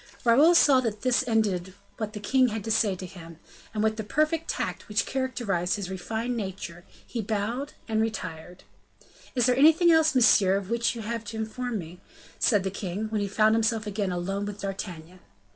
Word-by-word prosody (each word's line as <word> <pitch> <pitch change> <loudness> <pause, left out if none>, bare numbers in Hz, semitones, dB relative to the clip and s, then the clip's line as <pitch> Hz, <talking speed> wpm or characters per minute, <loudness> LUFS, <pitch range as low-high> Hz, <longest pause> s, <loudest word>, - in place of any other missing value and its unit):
Raoul 285 +9 +6
saw 280 -5 +6
that 220 -4 -3
this 255 0 +2
ended 195 -5 0 0.2
what 215 -2 -4
the 210 - -6
king 255 +5 +3
had 220 -3 -4
to 225 - -3
say 215 -3 +2
to 185 - -7
him. 170 -3 -11 0.3
And 215 -1 -2
with 220 0 +1
the 220 - -3
perfect 310 +8 0
tact - - -3
which 210 +1 +1
characterized 235 -9 -1
his 195 -3 -5
refined 225 +6 -3
nature, 190 -5 -6 0.2
he 235 - -4
bowed 225 +7 -3
and 220 -1 +1
retired. 180 -6 -5 0.7
"Is 245 -3 +3
there 250 0 +3
anything 320 +5 +6
else, 315 -2 +4
monsieur, 200 -6 +5
of 195 +1 -3
which 235 +1 +1
you 230 - -6
have 230 +1 -3
to 220 +2 -6
inform 225 +2 -3
me?" 175 0 -9 0.4
said 205 -5 +3
the 190 - -2
king, 200 +2 -4
when 215 -1 -1
he 200 - -1
found 215 +2 +3
himself 225 -1 +1
again 205 -2 -2
alone 195 +3 -3
with 205 0 -7
D'Artagnan. 185 -3 -6
215 Hz, 195 wpm, -27 LUFS, 190-235 Hz, 0.7 s, Raoul